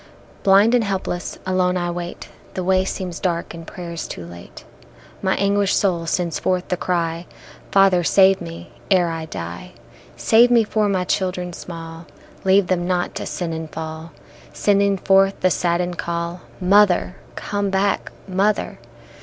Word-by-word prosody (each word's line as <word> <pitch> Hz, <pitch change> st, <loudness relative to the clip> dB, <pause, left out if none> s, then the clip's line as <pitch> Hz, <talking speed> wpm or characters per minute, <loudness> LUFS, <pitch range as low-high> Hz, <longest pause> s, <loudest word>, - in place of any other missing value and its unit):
~ -, -, -26 dB
Blind 200 Hz, +4 st, +5 dB
and 245 Hz, -2 st, +4 dB
helpless 190 Hz, -3 st, -3 dB
alone 185 Hz, -1 st, +1 dB
I 175 Hz, -1 st, -1 dB
wait; 175 Hz, 0 st, -6 dB, 0.3 s
The 185 Hz, -, -2 dB
way 185 Hz, +1 st, +2 dB
seems 180 Hz, -3 st, -4 dB
dark 170 Hz, -2 st, -2 dB
and 165 Hz, -1 st, -10 dB
prayers 170 Hz, -3 st, -6 dB
too 85 Hz, -, -7 dB
late, 85 Hz, 0 st, -12 dB, 0.6 s
My 190 Hz, -1 st, +1 dB
anguished 200 Hz, 0 st, +2 dB
soul 175 Hz, -4 st, 0 dB
sends 170 Hz, -1 st, -1 dB
forth 185 Hz, -1 st, -1 dB
the 180 Hz, -, +1 dB
cry, 170 Hz, -1 st, -2 dB, 0.4 s
Father 195 Hz, -2 st, +4 dB
save 190 Hz, +2 st, +4 dB
me, 165 Hz, -1 st, -8 dB, 0.2 s
ere 180 Hz, -3 st, +3 dB
I 165 Hz, -1 st, -4 dB
die; 85 Hz, -, -7 dB, 0.4 s
Save 235 Hz, +2 st, +5 dB
me 235 Hz, -2 st, +5 dB
for 215 Hz, -1 st, 0 dB
my 185 Hz, -2 st, +1 dB
children 180 Hz, -1 st, -2 dB
small, 165 Hz, -1 st, -9 dB, 0.4 s
Leave 190 Hz, +1 st, +4 dB
them 175 Hz, -1 st, -1 dB
not 180 Hz, -1 st, -1 dB
to -, -, -5 dB
sin 170 Hz, -2 st, -3 dB
and 160 Hz, -1 st, -5 dB
fall, 160 Hz, 0 st, -7 dB, 0.4 s
Sending 200 Hz, -1 st, +2 dB
forth 195 Hz, +1 st, +3 dB
the 185 Hz, -, +3 dB
saddened 175 Hz, +1 st, 0 dB
call, 170 Hz, +1 st, -3 dB, 0.2 s
Mother, 190 Hz, -1 st, +3 dB, 0.2 s
come 205 Hz, -1 st, -2 dB
back, 195 Hz, +1 st, 0 dB, 0.2 s
mother! 200 Hz, +3 st, 0 dB
180 Hz, 155 wpm, -21 LUFS, 170-195 Hz, 0.6 s, Blind